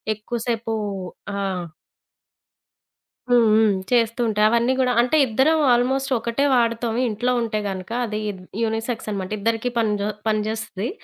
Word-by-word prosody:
ఎక్కువ 215 +3 -5
సేపు 225 -1 -1 0.6
ఆ! - - -2 1.9
హ్మ్, 240 -1 +6
హ్మ్. 220 0 +5 0.2
చేస్తూ 230 -1 +2
ఉంటాయి. 210 -1 +2
అవన్నీ 235 +2 +2
గూడా 250 -1 +2
అంటే 250 +6 +2
ఇద్దరం 265 +7 +2
ఆల్మోస్ట్ 265 +3 +1
ఒకటే 235 +5 0
వాడుతాం 230 -1 +1
ఇంట్లో 240 +3 -1
ఉంటే 220 -2 -1
గనక. 190 +1 -6
అది 215 -1 -3 0.4
యూనిసెక్స్ 225 +1 -2
అనమాట. 195 -1 -4
ఇద్దరికీ 225 +3 0
పనిజొ 210 -2 0 0.2
పనిజేస్తది. 215 -1 -2
230 Hz, 125 wpm, -22 LUFS, 215-245 Hz, 1.9 s, హ్మ్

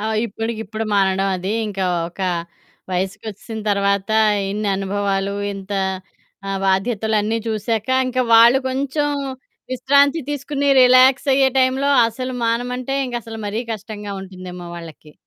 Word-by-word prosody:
ఆ! 215 - -4 0.2
ఇప్పడికిప్పుడు 225 0 -4
మానడం 195 0 +2
అది 185 +3 -3 0.2
ఇంకా 195 -2 -3 0.2
ఒక 175 - -13 0.7
వయసుకొచ్చేసిన 200 +4 -4
తర్వాత 200 0 +1 0.4
ఇన్ని 210 0 -2
అనుభవాలు 195 0 -1 0.2
ఇంత 195 +1 -8 0.8
ఆహ్, 195 0 -2
బాధ్యతలన్నీ 215 +2 +1
చూసాక 220 +1 -2 0.2
ఇంకా 255 0 0
వాళ్ళు 235 +3 +7
కొంచెం 280 +3 -1 0.6
విశ్రాంతి 280 +4 +3
తీసుకొని 285 0 -2
రిలాక్స్ 255 +2 +5
అయ్యే 270 0 +4
టైమ్‌లో 260 +2 +2 0.2
అసలు 255 +3 -5
మానమంటే 245 +3 -1
ఇంక 245 - -7
అసలు 225 0 -8
మరీ 215 +3 -2
కష్టంగా 210 -1 -7
ఉంటుందేమో 185 -2 -9
వాళ్ళకి? 160 -2 -11
220 Hz, 120 wpm, -20 LUFS, 195-255 Hz, 0.8 s, వాళ్ళు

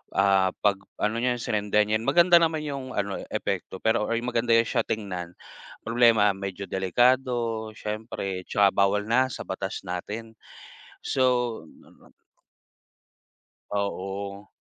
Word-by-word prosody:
Ah, 95 -1 +3
'pag 100 -2 +3 0.2
ano 105 +1 +1
niyan, 125 0 0
sinindihan, 105 +1 +1
maganda 175 0 +6
naman 160 -2 +1
yung 140 -3 -5
ano 100 -1 -2
eh, - - -9
epekto 95 - -3
pero 110 -1 +2
or 115 - 0
maganda 120 -1 0
'yan 115 - +5
siya 115 -3 +1
tingnan, 90 -5 -4 0.5
problema 115 -3 +4
medyo 95 0 -5
delikado 120 +3 +1
siyempre 105 -4 -5
tsaka 100 -1 +4
bawal 100 +1 +2
na 130 +3 +3
sa 130 - -6
batas 95 +2 -4
natin. 105 +6 -5 0.7
So 130 -1 +1 2.5
Oo. 100 0 -4
105 Hz, 120 wpm, -26 LUFS, 100-120 Hz, 2.5 s, maganda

